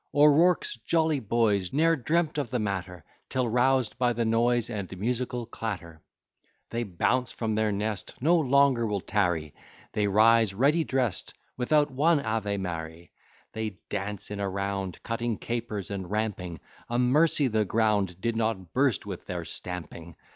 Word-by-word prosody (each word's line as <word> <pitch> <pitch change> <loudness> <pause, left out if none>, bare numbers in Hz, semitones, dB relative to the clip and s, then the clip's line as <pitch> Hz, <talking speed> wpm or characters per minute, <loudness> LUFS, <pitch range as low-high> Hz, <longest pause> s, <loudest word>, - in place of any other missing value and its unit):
O'Rourke's 150 +1 +4
jolly 160 +5 +1
boys 105 -5 +1
Ne'er 165 +3 +3
dreamt 155 +2 0
of 140 -5 -2
the 125 - -1
matter, 95 -4 -3 0.3
Till, 130 -2 0
roused 125 +1 +2
by 125 -1 +2
the 115 0 -1
noise, 115 +1 +2
And 100 -5 -5
musical 120 +3 -2
clatter, 90 -8 -6 0.7
They 115 - -1
bounce 120 +5 0
from 110 -2 -2
their 110 0 +1
nest, 105 0 -3
No 160 +7 +4
longer 140 -4 +3
will 100 -2 -1
tarry, 85 -8 0 0.4
They 105 -1 +1
rise 110 0 +4
ready 145 +9 +3
drest, 130 - -1 0.2
Without 145 +3 +2
one 150 +4 +3
Ave 110 -5 -1
Mary. 85 -2 -6 0.4
They 110 -3 -4
dance 105 +1 -4
in 105 - -4
a 100 -1 -1
round, 100 -1 -3
Cutting 115 -1 -2
capers 115 -5 -4
and 95 -3 -4
ramping; 95 -6 -3 0.3
A 120 - 0
mercy 140 +4 +3
the 110 -2 +1
ground 105 -4 +1
Did 115 +4 -1
not 110 -6 -2
burst 130 -4 +2
with - - -7
their - - -4
stamping. 85 -2 -7
110 Hz, 155 wpm, -27 LUFS, 100-125 Hz, 0.7 s, O'Rourke's